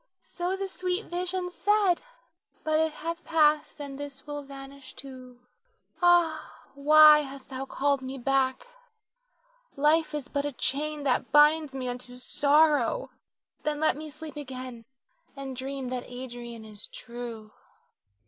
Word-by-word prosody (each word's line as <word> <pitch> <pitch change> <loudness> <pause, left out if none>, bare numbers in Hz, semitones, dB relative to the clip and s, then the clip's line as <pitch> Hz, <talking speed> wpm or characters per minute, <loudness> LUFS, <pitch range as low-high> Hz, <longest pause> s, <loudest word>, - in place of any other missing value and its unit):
So 355 +2 -2
the 390 0 -3
sweet 370 +2 -2
vision 360 +1 -2
said, 400 -1 +2 0.6
but 310 0 +2
it 320 0 +2
hath 335 +2 -5
passed, 305 -1 +2
and 280 -1 -6
this 280 -2 -7
will 290 -1 -5
vanish 275 -1 -11
too. 255 -2 -11 0.6
Ah, 345 -3 +2
why 300 +2 +8
hast 275 -2 -7
thou 265 0 -4
called 280 0 0
me 260 +1 -6
back? 270 - +1 1.1
Life 305 +2 +3
is 295 -3 -4
but 285 -1 -1
a 290 -1 -3
chain 290 +4 -2
that 260 -1 0
binds 295 0 +5
me 255 -1 -3
unto 245 0 -6
sorrow, 295 - +3 0.5
then 300 -1 -2
let 315 -2 +3
me 310 +1 -7
sleep 305 +1 -9
again 255 -4 -7 0.5
and 270 -1 -6
dream 265 0 -4
that 250 -1 -3
Adrian 240 -2 -7
is 210 -1 -9
true. 235 -3 -8
285 Hz, 140 wpm, -28 LUFS, 260-310 Hz, 1.1 s, why